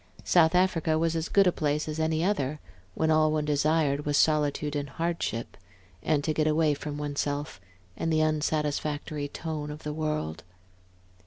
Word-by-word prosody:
South 170 Hz, -1 st, +4 dB
Africa 165 Hz, -3 st, +2 dB
was 165 Hz, 0 st, +1 dB
as 160 Hz, 0 st, -2 dB
good 200 Hz, -1 st, +5 dB
a 180 Hz, -, +4 dB
place 150 Hz, -1 st, -1 dB
as 155 Hz, +1 st, -4 dB
any 160 Hz, 0 st, +1 dB
other, 155 Hz, -7 st, 0 dB, 0.4 s
when 160 Hz, 0 st, +1 dB
all 155 Hz, 0 st, +4 dB
one 155 Hz, -1 st, 0 dB
desired 150 Hz, -1 st, +1 dB
was 145 Hz, -1 st, +1 dB
solitude 150 Hz, -1 st, +2 dB
and 145 Hz, -1 st, -3 dB
hardship, 165 Hz, -9 st, -3 dB, 0.5 s
and 150 Hz, -2 st, +1 dB
to 155 Hz, -, 0 dB
get 155 Hz, 0 st, +1 dB
away 155 Hz, -1 st, +3 dB
from 145 Hz, 0 st, -5 dB
one's 145 Hz, -1 st, -4 dB
self, 145 Hz, -7 st, -3 dB, 0.3 s
and 165 Hz, -, -2 dB
the 155 Hz, -, +2 dB
unsatisfactory 150 Hz, -1 st, -1 dB
tone 150 Hz, 0 st, -5 dB
of 150 Hz, +1 st, -8 dB
the 150 Hz, -, -3 dB
world. 150 Hz, -, -3 dB
155 Hz, 170 wpm, -28 LUFS, 145-160 Hz, 0.5 s, good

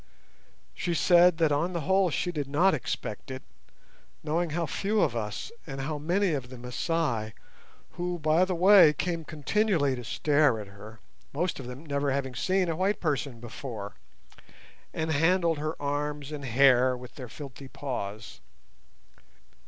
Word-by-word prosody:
She 170 Hz, -, -2 dB
said 175 Hz, 0 st, +5 dB
that 160 Hz, -2 st, +2 dB
on 165 Hz, +6 st, 0 dB
the 170 Hz, -, -2 dB
whole 190 Hz, +3 st, +3 dB
she 175 Hz, +3 st, -1 dB
did 145 Hz, -5 st, -3 dB
not 160 Hz, +7 st, +3 dB
expect 120 Hz, -6 st, -4 dB
it, 130 Hz, 0 st, -6 dB, 0.8 s
knowing 165 Hz, +3 st, 0 dB
how 170 Hz, +2 st, -1 dB
few 205 Hz, +7 st, -1 dB
of 120 Hz, -, +2 dB
us, 105 Hz, -2 st, -4 dB, 0.2 s
and 135 Hz, -2 st, -6 dB
how 150 Hz, +2 st, -3 dB
many 180 Hz, +5 st, +1 dB
of 135 Hz, -5 st, -3 dB
the 130 Hz, -, -9 dB
Masai—who, 125 Hz, -, -4 dB
by 155 Hz, +2 st, +3 dB
the 185 Hz, -1 st, 0 dB
way, 180 Hz, -3 st, +7 dB
came 170 Hz, +2 st, -2 dB
continually 155 Hz, -1 st, 0 dB
to 125 Hz, -, -7 dB
stare 145 Hz, 0 st, +2 dB
at 105 Hz, -, -6 dB
her, 105 Hz, +2 st, -13 dB, 0.3 s
most 170 Hz, +3 st, -1 dB
of 130 Hz, -, -7 dB
them 125 Hz, +5 st, -9 dB
never 140 Hz, -1 st, -1 dB
having 135 Hz, -1 st, -2 dB
seen 185 Hz, +8 st, +1 dB
a 165 Hz, -, -1 dB
white 195 Hz, +4 st, 0 dB
person 140 Hz, -6 st, -2 dB
before, 115 Hz, -3 st, -7 dB, 1.0 s
and 160 Hz, 0 st, -2 dB
handled 165 Hz, +1 st, +2 dB
her 155 Hz, +2 st, -3 dB
arms 145 Hz, 0 st, -3 dB
and 145 Hz, -2 st, -6 dB
hair 130 Hz, 0 st, +4 dB
with 125 Hz, 0 st, -11 dB
their 125 Hz, -4 st, -9 dB
filthy 140 Hz, +1 st, -9 dB
paws. 105 Hz, -, -6 dB
150 Hz, 155 wpm, -28 LUFS, 130-170 Hz, 1.0 s, way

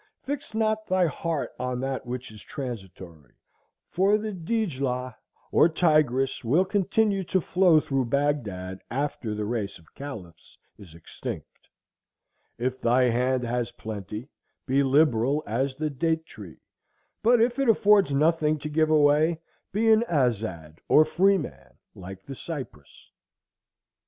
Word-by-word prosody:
—Fix 280 Hz, -5 st, -5 dB
not 215 Hz, -1 st, 0 dB
thy 185 Hz, -1 st, +3 dB
heart 165 Hz, +1 st, -2 dB
on 125 Hz, -1 st, -2 dB
that 135 Hz, -1 st, -3 dB
which 125 Hz, -1 st, -5 dB
is 105 Hz, -1 st, -12 dB
transitory; 95 Hz, -, -8 dB, 0.6 s
for 195 Hz, +3 st, +3 dB
the 215 Hz, 0 st, -4 dB
Dijlah, 140 Hz, -, -2 dB, 0.4 s
or 170 Hz, -, +5 dB
Tigris, 155 Hz, -7 st, +2 dB
will 150 Hz, +11 st, +3 dB
continue 200 Hz, +1 st, +1 dB
to 190 Hz, -, +1 dB
flow 180 Hz, -2 st, +4 dB
through 135 Hz, -3 st, -1 dB
Bagdad 110 Hz, -10 st, -2 dB
after 130 Hz, -4 st, -3 dB
the 105 Hz, 0 st, -3 dB
race 105 Hz, -3 st, -3 dB
of 80 Hz, -2 st, -23 dB
caliphs 100 Hz, -, -10 dB, 0.2 s
is 90 Hz, -6 st, -14 dB
extinct: 85 Hz, -, -9 dB, 0.9 s
if 125 Hz, +2 st, -3 dB
thy 125 Hz, +2 st, +3 dB
hand 125 Hz, +2 st, +1 dB
has 120 Hz, -1 st, -2 dB
plenty, 105 Hz, +2 st, -7 dB, 0.4 s
be 135 Hz, +1 st, +2 dB
liberal 140 Hz, 0 st, +2 dB
as 130 Hz, +5 st, -1 dB
the 155 Hz, +1 st, -2 dB
date 160 Hz, +3 st, -1 dB
tree; 100 Hz, -, -12 dB, 0.6 s
but 240 Hz, +2 st, +4 dB
if 240 Hz, +3 st, +2 dB
it 275 Hz, -3 st, +2 dB
affords 205 Hz, -5 st, +4 dB
nothing 155 Hz, +1 st, +2 dB
to 150 Hz, +1 st, -6 dB
give 155 Hz, +1 st, +2 dB
away, 155 Hz, +2 st, +3 dB, 0.3 s
be 225 Hz, +3 st, +2 dB
an 220 Hz, +1 st, +5 dB
azad, 105 Hz, -, -1 dB
or 155 Hz, -, +6 dB
free 195 Hz, +4 st, +3 dB
man, 75 Hz, -, -8 dB, 0.2 s
like 95 Hz, +1 st, -10 dB
the 140 Hz, -, -7 dB
cypress." 135 Hz, -, -9 dB
140 Hz, 135 wpm, -26 LUFS, 115-170 Hz, 0.9 s, or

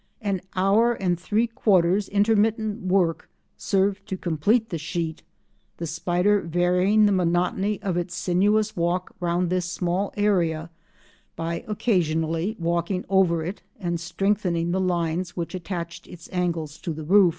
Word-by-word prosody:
An 195 Hz, -3 st, -1 dB
hour 205 Hz, +6 st, +3 dB
and 180 Hz, -6 st, -1 dB
three 215 Hz, +5 st, +1 dB
quarters 195 Hz, -4 st, +2 dB
intermittent 215 Hz, +1 st, +2 dB
work 180 Hz, -3 st, +1 dB, 0.3 s
served 195 Hz, +1 st, 0 dB
to 190 Hz, -, -3 dB
complete 200 Hz, +8 st, +1 dB
the 170 Hz, -, -3 dB
sheet, 160 Hz, 0 st, -3 dB, 0.6 s
the 170 Hz, -, -4 dB
spider 180 Hz, +5 st, +1 dB
varying 180 Hz, +5 st, +3 dB
the 205 Hz, -, +4 dB
monotony 185 Hz, +3 st, +1 dB
of 185 Hz, -4 st, -1 dB
its 175 Hz, 0 st, -3 dB
sinuous 205 Hz, +4 st, +1 dB
walk 175 Hz, +2 st, -1 dB
round 175 Hz, 0 st, 0 dB
this 180 Hz, -1 st, 0 dB
small 180 Hz, +2 st, -1 dB
area 170 Hz, -6 st, +1 dB, 0.6 s
by 165 Hz, +1 st, -3 dB
occasionally 170 Hz, -3 st, 0 dB
walking 170 Hz, +2 st, -1 dB
over 180 Hz, -4 st, +3 dB
it 185 Hz, +4 st, -5 dB, 0.2 s
and 175 Hz, -3 st, -2 dB
strengthening 175 Hz, -1 st, 0 dB
the 190 Hz, +1 st, 0 dB
lines 175 Hz, -1 st, -1 dB
which 170 Hz, +1 st, -3 dB
attached 170 Hz, -2 st, -5 dB
its 175 Hz, -1 st, -12 dB
angles 165 Hz, -4 st, -2 dB
to 165 Hz, -, -4 dB
the 155 Hz, +1 st, -7 dB
roof. 190 Hz, +3 st, +6 dB
180 Hz, 140 wpm, -24 LUFS, 170-200 Hz, 0.6 s, roof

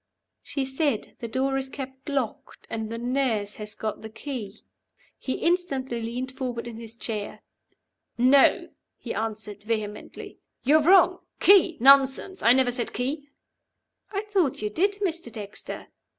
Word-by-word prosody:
"She 275 Hz, -2 st, -3 dB
said, 265 Hz, -3 st, -1 dB
'The 235 Hz, -, -4 dB
door 265 Hz, +3 st, 0 dB
is 265 Hz, 0 st, -5 dB
kept 265 Hz, 0 st, -8 dB
locked, 270 Hz, -6 st, -3 dB
and 220 Hz, -1 st, -3 dB
the 230 Hz, -, -4 dB
nurse 240 Hz, -4 st, -1 dB
has 210 Hz, 0 st, -7 dB
got 215 Hz, -1 st, -4 dB
the 220 Hz, -, -8 dB
key.'" 225 Hz, -4 st, -7 dB, 0.6 s
He 260 Hz, -, -2 dB
instantly 275 Hz, -9 st, 0 dB
leaned 245 Hz, +3 st, -4 dB
forward 250 Hz, -3 st, -4 dB
in 230 Hz, -2 st, -7 dB
his 230 Hz, -1 st, -9 dB
chair. 215 Hz, -3 st, -5 dB, 0.7 s
"No!" 260 Hz, +3 st, +5 dB, 0.3 s
he 235 Hz, -, -5 dB
answered, 215 Hz, -2 st, -4 dB
vehemently. 210 Hz, -1 st, -5 dB, 0.2 s
"You're 305 Hz, +4 st, +5 dB
wrong. 365 Hz, +2 st, +6 dB, 0.2 s
'Key?' 380 Hz, -4 st, +6 dB
Nonsense! 275 Hz, +8 st, +5 dB
I 235 Hz, -, +6 dB
never 255 Hz, 0 st, +4 dB
said 240 Hz, -1 st, -3 dB
'Key.'" 280 Hz, +4 st, -3 dB, 0.8 s
"I 400 Hz, -1 st, -1 dB
thought 385 Hz, -, 0 dB
you 210 Hz, -, -1 dB
did, 395 Hz, -, +2 dB
Mr. 335 Hz, -, -2 dB
Dexter." 210 Hz, -2 st, -7 dB
255 Hz, 145 wpm, -26 LUFS, 225-280 Hz, 0.8 s, wrong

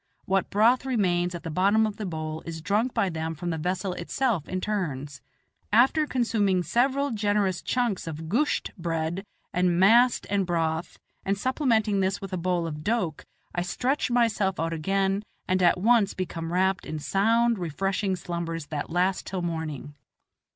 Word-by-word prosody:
What 195 Hz, -1 st, +1 dB
broth 230 Hz, +6 st, +4 dB
remains 180 Hz, -9 st, +1 dB
at 170 Hz, -, -7 dB
the 165 Hz, -, -4 dB
bottom 200 Hz, +6 st, +3 dB
of 215 Hz, -1 st, -4 dB
the 210 Hz, -, -4 dB
bowl 155 Hz, -2 st, -4 dB
is 165 Hz, -1 st, -5 dB
drunk 205 Hz, +9 st, 0 dB
by 200 Hz, -, +1 dB
them 160 Hz, -1 st, -3 dB
from 175 Hz, +3 st, -3 dB
the 160 Hz, -, -3 dB
vessel 180 Hz, +3 st, -2 dB
itself 190 Hz, -, -1 dB
in 185 Hz, -, -2 dB
turns. 145 Hz, -10 st, -3 dB, 0.5 s
After 265 Hz, +8 st, +4 dB
consuming 210 Hz, -8 st, +1 dB
several 270 Hz, +6 st, +1 dB
generous 205 Hz, -4 st, 0 dB
chunks 240 Hz, -9 st, -1 dB
of 160 Hz, 0 st, -6 dB
"gusht" 250 Hz, -, 0 dB
bread 165 Hz, +2 st, -2 dB, 0.3 s
and 180 Hz, -1 st, +2 dB
mast 235 Hz, +6 st, +5 dB
and 200 Hz, -2 st, 0 dB
broth, 165 Hz, -1 st, -1 dB, 0.3 s
and 195 Hz, +1 st, 0 dB
supplementing 225 Hz, -4 st, +1 dB
this 190 Hz, +1 st, 0 dB
with 195 Hz, -2 st, -7 dB
a -, -, 0 dB
bowl 175 Hz, -1 st, 0 dB
of 150 Hz, -2 st, -5 dB
doke, 190 Hz, -8 st, -1 dB, 0.3 s
I 175 Hz, -, -1 dB
stretch 250 Hz, +12 st, -1 dB
myself 230 Hz, -6 st, +1 dB
out 165 Hz, +1 st, -1 dB
again 195 Hz, +4 st, 0 dB, 0.3 s
and 185 Hz, 0 st, +1 dB
at 175 Hz, 0 st, +4 dB
once 220 Hz, 0 st, +3 dB
become 165 Hz, -3 st, -4 dB
wrapped 190 Hz, +1 st, +1 dB
in 155 Hz, -, -4 dB
sound, 225 Hz, +7 st, +2 dB
refreshing 190 Hz, +4 st, -1 dB
slumbers 170 Hz, -2 st, -4 dB
that 150 Hz, -2 st, -4 dB
last 180 Hz, +2 st, 0 dB
till 185 Hz, -2 st, -3 dB
morning. 160 Hz, -4 st, -4 dB
190 Hz, 165 wpm, -26 LUFS, 165-215 Hz, 0.5 s, mast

